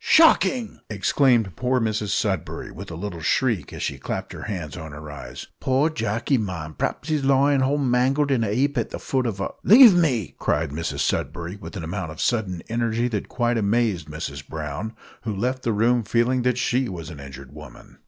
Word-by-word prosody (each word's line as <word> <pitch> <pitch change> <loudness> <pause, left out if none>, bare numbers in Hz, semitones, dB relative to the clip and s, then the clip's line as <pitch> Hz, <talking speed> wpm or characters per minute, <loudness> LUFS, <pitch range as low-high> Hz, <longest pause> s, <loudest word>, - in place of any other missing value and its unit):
"Shocking!" 260 -8 +4
exclaimed 110 - +2
poor 125 0 +1
Mrs 110 -2 -1
Sudberry, 95 -6 -2
with 95 +2 -9
a 85 - -6
little 85 -1 -5
shriek, 120 +1 +1
as - - -6
she - - -3
clapped - - -4
her - - -8
hands 90 -9 -5
on 80 -3 -8
her 75 0 -8
eyes. 75 - -8
"Poor 135 +5 +2
Jacky, 115 +1 0
ma'am, 85 -7 -4
p'raps 150 - -3
'e's 150 -3 +1
lyin' 135 +1 +4
hall 135 +2 +2
in 145 - -1
a - - 0
mangled 130 +4 +2
'eap 125 +3 +1
at 115 - -2
the - - -5
foot 130 -2 -1
of 100 -4 -3
a 100 - -1
" - - -43
"Leave 235 +1 +9
me!" 135 - +1
cried 75 -1 0
Mrs 80 +3 -3
Sudberry, 85 +2 -2
with 105 0 -9
an 90 - -5
amount 90 +1 -4
of 75 - -11
sudden 100 -8 -1
energy 115 +1 0
that 105 -4 -3
quite 120 -1 0
amazed 105 -6 +1
Mrs 75 -3 -6
Brown, 80 +8 -5 0.3
who 110 -3 -3
left 125 +6 -1
the 115 - 0
room 115 +3 +3
feeling 120 +4 +1
that 125 0 +1
she 125 0 +1
was 85 -3 -7
an 75 - -10
injured 70 -1 -10
woman. 75 -5 -13
110 Hz, 200 wpm, -24 LUFS, 85-130 Hz, 0.3 s, Leave